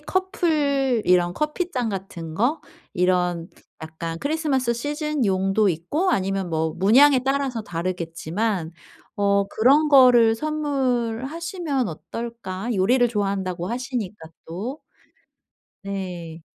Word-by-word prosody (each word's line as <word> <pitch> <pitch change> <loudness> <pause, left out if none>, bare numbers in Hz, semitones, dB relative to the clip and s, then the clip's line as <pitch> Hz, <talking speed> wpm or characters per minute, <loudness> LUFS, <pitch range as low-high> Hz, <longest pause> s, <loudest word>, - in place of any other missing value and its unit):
커플 300 - 0
이런 175 -1 +3
커피잔 300 -5 -2
같은 180 -5 -6
거? 250 - +1 0.3
이런 180 -1 +1 0.3
약간 165 +1 -6
크리스마스 285 - 0
시즌용도 235 - 0
있고 195 - 0
아니면 195 - -1
뭐 160 0 0
문양에 255 +9 +6
따라서 270 -4 -1
다르겠지만 175 +1 -3 0.4
'어 200 -1 +2
그런 280 +7 +4
거를 250 -5 +6
선물하시면 280 - -2
어떨까?' 230 +3 -6
요리를 240 +6 +3
좋아한다고 195 -5 -2
하시니까 235 -8 -4 0.2
또. 215 - -5 1.0
네. 180 -4 -6
225 Hz, 245 characters per minute, -23 LUFS, 185-275 Hz, 1.0 s, 문양에